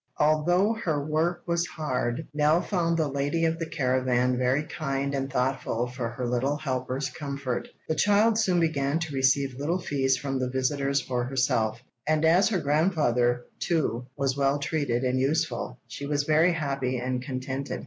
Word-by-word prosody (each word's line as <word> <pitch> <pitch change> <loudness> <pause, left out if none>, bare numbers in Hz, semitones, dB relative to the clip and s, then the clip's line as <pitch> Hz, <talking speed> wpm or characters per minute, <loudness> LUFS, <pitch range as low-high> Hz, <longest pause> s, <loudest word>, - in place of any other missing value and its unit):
Although 175 +8 +3
her 150 -4 0
work 165 +3 0
was 170 0 0
hard, 140 -2 -2
Nell 150 +2 +3
found 170 -3 0
the 160 -2 +1
lady 145 +4 0
of 165 0 0
the 165 -1 -4
caravan 125 -1 +1
very 130 +4 +1
kind 140 -2 -3
and 135 -1 -2
thoughtful 125 -2 0
for 125 -1 -4
her 120 +2 -4
little 130 +4 0
helper's 130 -1 -2
comfort. 140 -3 -4 0.2
The - - +1
child 210 +6 +3
soon 185 -5 +2
began 150 -3 +1
to 160 -3 -4
receive 135 0 +1
little 160 +5 0
fees 135 -6 0
from 135 -2 -3
the 130 -1 -1
visitors 140 +2 0
for 125 -1 -2
herself, 125 -3 0 0.2
and 155 +1 +2
as 175 +6 +5
her 210 - +1
grandfather, 140 -6 +1
too, 125 -8 -1
was 135 -2 0
well 140 0 +2
treated 140 -4 -1
and 130 0 +1
useful, 135 -3 -1
she 140 - -7
was 145 0 0
very 160 +4 +4
happy 135 -5 -1
and 125 +1 -2
contented. 130 +1 -4
140 Hz, 170 wpm, -27 LUFS, 130-160 Hz, 0.2 s, as